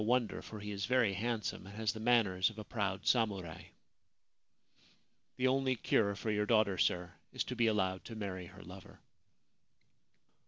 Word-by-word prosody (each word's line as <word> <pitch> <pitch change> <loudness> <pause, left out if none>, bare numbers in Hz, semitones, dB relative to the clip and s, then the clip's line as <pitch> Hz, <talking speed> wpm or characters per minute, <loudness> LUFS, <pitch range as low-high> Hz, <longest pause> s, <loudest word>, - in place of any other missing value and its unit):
wonder, 120 0 +1
for 110 - -8
he 105 0 -6
is 100 -2 -3
very 125 -6 +3
handsome 110 -1 -2
and 100 - -10
has 110 -3 0
the 110 - -7
manners 110 -5 +3
of 110 - -13
a 110 - -5
proud 100 -3 -2
samurai. 100 -9 0 1.7
The 130 - +1
only 130 0 +2
cure 100 -3 +2
for 110 +2 -2
your 105 0 0
daughter, 110 -5 +3
sir, 90 0 +1 0.2
is - - -1
to 125 - -5
be 120 -1 +3
allowed 95 -4 +1
to 115 - -7
marry 95 -4 -5
her - - -13
lover.' 90 +2 -12
105 Hz, 165 wpm, -34 LUFS, 95-115 Hz, 1.7 s, very